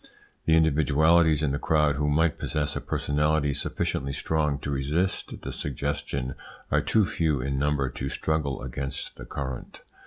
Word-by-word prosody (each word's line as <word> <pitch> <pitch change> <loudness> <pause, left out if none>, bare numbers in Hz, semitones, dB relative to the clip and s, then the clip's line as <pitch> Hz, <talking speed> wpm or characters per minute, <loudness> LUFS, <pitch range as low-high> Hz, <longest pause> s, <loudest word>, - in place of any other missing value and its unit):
The 80 - +5
individualities 80 +1 +4
in 70 - +1
the 70 - -1
crowd 75 -3 +2
who 75 0 +1
might 80 +2 +2
possess 75 -2 -1
a - - -2
personality 75 0 +1
sufficiently 70 0 -2
strong 75 -1 0
to 70 - -3
resist 75 +7 -1
the - - -4
suggestion 70 -1 -2 0.4
are - - +3
too 110 -3 +3
few 80 -5 0
in 70 +1 -1
number 70 -1 +1
to 65 +1 -4
struggle 70 -2 -1
against 65 +2 -4
the - - -8
current. 65 -3 -6
75 Hz, 155 wpm, -27 LUFS, 70-80 Hz, 0.4 s, The